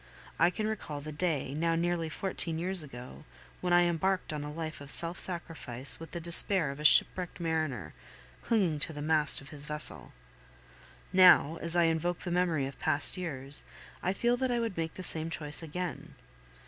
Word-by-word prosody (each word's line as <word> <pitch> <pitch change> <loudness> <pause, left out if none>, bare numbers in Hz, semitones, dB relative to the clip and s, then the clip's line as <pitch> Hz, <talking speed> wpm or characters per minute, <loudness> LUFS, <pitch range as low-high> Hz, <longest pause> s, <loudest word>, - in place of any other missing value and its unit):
I 170 - +3
can 215 +4 -6
recall 210 -9 -6
the 155 +2 -10
day, 150 -4 -4
now 165 +2 -2
nearly 170 -1 -3
fourteen 165 -1 -3
years 185 +2 -3
ago, 125 -3 -12 0.4
when 180 - -4
I 175 0 +3
embarked 175 +1 -3
on 150 -1 -6
a 150 - -8
life 155 -1 -8
of 145 - -12
self 170 +4 0
sacrifice 155 -8 0
with 165 - -11
the 170 - -8
despair 170 -1 +1
of 140 - -12
a - - -8
shipwrecked 180 +4 +8
mariner 155 - -5 0.5
clinging 185 -10 -2
to 160 - 0
the 145 - -9
mast 155 -3 0
of 135 - -15
his 145 0 -7
vessel; 150 0 -4 1.0
now, 180 -4 +4
as 170 +1 -3
I 175 - +2
invoke 165 +1 -2
the 175 - -6
memory 170 -5 -2
of 135 0 -10
past 145 - 0
years, 145 -6 +4 0.4
I 185 - -2
feel 240 +5 -1
that 260 0 -3
I 240 -1 -2
would 230 -4 -5
make 165 -1 -6
the 185 - -9
same 160 -2 +6
choice 150 -2 -1
again. 175 +2 -8
165 Hz, 185 wpm, -28 LUFS, 150-180 Hz, 1.0 s, shipwrecked